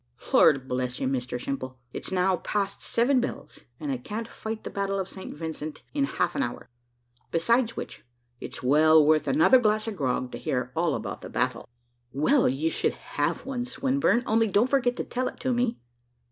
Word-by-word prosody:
"Lord 135 -3 +5
bless 125 0 -2
you, - - 0
Mr 125 -2 -2
Simple! 130 0 -4 0.2
it's - - -5
now 185 0 +2
past 200 +2 -2
seven 250 +2 +2
bells, 245 - -6 0.2
and 295 - -3
I 265 - -1
can't 225 -1 -5
fight 220 -1 -6
the - - -6
battle 195 0 -1
of 190 - -2
St. 190 0 -8
Vincent 155 -1 -6
in 280 -1 +2
half - - -1
an 280 - 0
hour; - - -4 0.6
besides 230 +8 +2
which, - - -7 0.4
it's - - -7
well 155 +3 +6
worth 155 0 +3
another 270 -3 +6
glass 215 -1 +1
of 220 - -3
grog 130 -4 -1
to - - -6
hear 125 -1 -2
all 165 -2 +1
about 105 -3 -5
that - - -8
battle." 125 -1 -1 0.4
"Well, 245 - +3
you 150 +5 0
shall - - +1
have - - -3
one, 260 -2 -2
Swinburne; 260 -1 +1
only 225 +1 +3
don't 215 +5 +2
forget 250 -3 +2
to - - -3
tell 255 +1 -2
it - - -7
to, 255 0 0
me." 240 -1 0
195 Hz, 190 wpm, -27 LUFS, -, 0.6 s, well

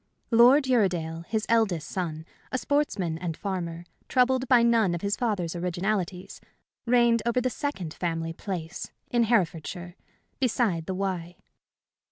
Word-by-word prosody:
Lord 245 +5 +7
Uredale, 175 -9 +1
his 220 -1 -1
eldest 200 -9 +2
son, 160 -4 -4 0.3
a 255 - 0
sportsman 215 - 0
and 170 -2 -4
farmer, 175 -4 -4 0.2
troubled 255 0 +2
by 245 -2 +5
none 225 -7 +3
of 170 - -5
his 200 0 +1
father's 200 -9 -1
originalities, 180 +1 -2 0.5
reigned 235 -1 +4
over 235 +2 +1
the 255 0 0
second 215 - -4
family 165 -2 -2
"place," 175 -3 -5 0.2
in 240 -1 +3
Herefordshire, 175 -4 -1 0.4
beside 225 -10 +1
the 190 - -2
Wye. 180 -3 -3
190 Hz, 135 wpm, -27 LUFS, 170-235 Hz, 0.5 s, Lord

